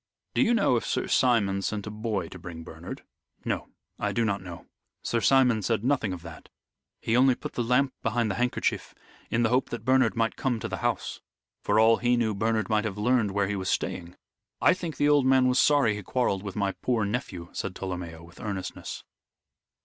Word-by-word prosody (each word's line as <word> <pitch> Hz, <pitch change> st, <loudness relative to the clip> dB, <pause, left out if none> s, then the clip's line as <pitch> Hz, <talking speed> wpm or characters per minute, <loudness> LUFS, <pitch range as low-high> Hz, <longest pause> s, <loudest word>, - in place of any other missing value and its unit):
"Do -, -, +2 dB
you 240 Hz, -2 st, +4 dB
know 200 Hz, -, +3 dB
if -, -, -2 dB
Sir -, -, -1 dB
Simon 100 Hz, -6 st, +2 dB
sent 105 Hz, +1 st, -3 dB
a 105 Hz, -, -5 dB
boy 105 Hz, -4 st, -2 dB
to 95 Hz, -, -10 dB
bring 85 Hz, -1 st, -8 dB
Bernard?" -, -, -9 dB, 0.4 s
"No. -, -, -2 dB, 0.3 s
I -, -, 0 dB
do 115 Hz, -, +1 dB
not 100 Hz, -3 st, -1 dB
know. 90 Hz, -2 st, -9 dB, 0.4 s
Sir 115 Hz, -, 0 dB
Simon 125 Hz, -4 st, +4 dB
said 110 Hz, +1 st, 0 dB
nothing 130 Hz, -6 st, +1 dB
of 90 Hz, -2 st, -6 dB
that. 85 Hz, -2 st, -11 dB, 0.5 s
He 115 Hz, -, 0 dB
only 130 Hz, +1 st, +5 dB
put -, -, -7 dB
the -, -, -1 dB
lamp 125 Hz, +3 st, +2 dB
behind 115 Hz, -1 st, 0 dB
the 115 Hz, -, -3 dB
handkerchief 125 Hz, 0 st, -1 dB, 0.3 s
in 115 Hz, +1 st, +1 dB
the 115 Hz, -, +3 dB
hope 125 Hz, +2 st, +1 dB
that 115 Hz, -2 st, -6 dB
Bernard 130 Hz, -3 st, +3 dB
might 115 Hz, -1 st, 0 dB
come 125 Hz, -5 st, -1 dB
to -, -, -4 dB
the -, -, -4 dB
house. -, -, -2 dB, 0.4 s
For -, -, +2 dB
all 115 Hz, +1 st, +6 dB
he 120 Hz, 0 st, +2 dB
knew 110 Hz, -2 st, +1 dB
Bernard 110 Hz, +2 st, 0 dB
might 110 Hz, -1 st, +1 dB
have 105 Hz, -2 st, -3 dB
learned 115 Hz, 0 st, +2 dB
where 100 Hz, 0 st, 0 dB
he 105 Hz, -, -2 dB
was 95 Hz, -1 st, -3 dB
staying. 85 Hz, 0 st, -2 dB, 0.4 s
I -, -, +5 dB
think 175 Hz, -3 st, -5 dB
the 145 Hz, -, +3 dB
old 145 Hz, -3 st, +4 dB
man 130 Hz, -1 st, +5 dB
was 125 Hz, +1 st, +3 dB
sorry 140 Hz, -7 st, +4 dB
he 105 Hz, -, -5 dB
quarrelled 100 Hz, -2 st, 0 dB
with 100 Hz, -2 st, -7 dB
my 100 Hz, -2 st, 0 dB
poor 115 Hz, 0 st, -1 dB
nephew," 100 Hz, -6 st, -4 dB
said 95 Hz, -1 st, -4 dB
Tolomeo, 90 Hz, -3 st, -6 dB
with 85 Hz, 0 st, -15 dB
earnestness. 100 Hz, -4 st, -5 dB
110 Hz, 210 wpm, -27 LUFS, 100-125 Hz, 0.5 s, all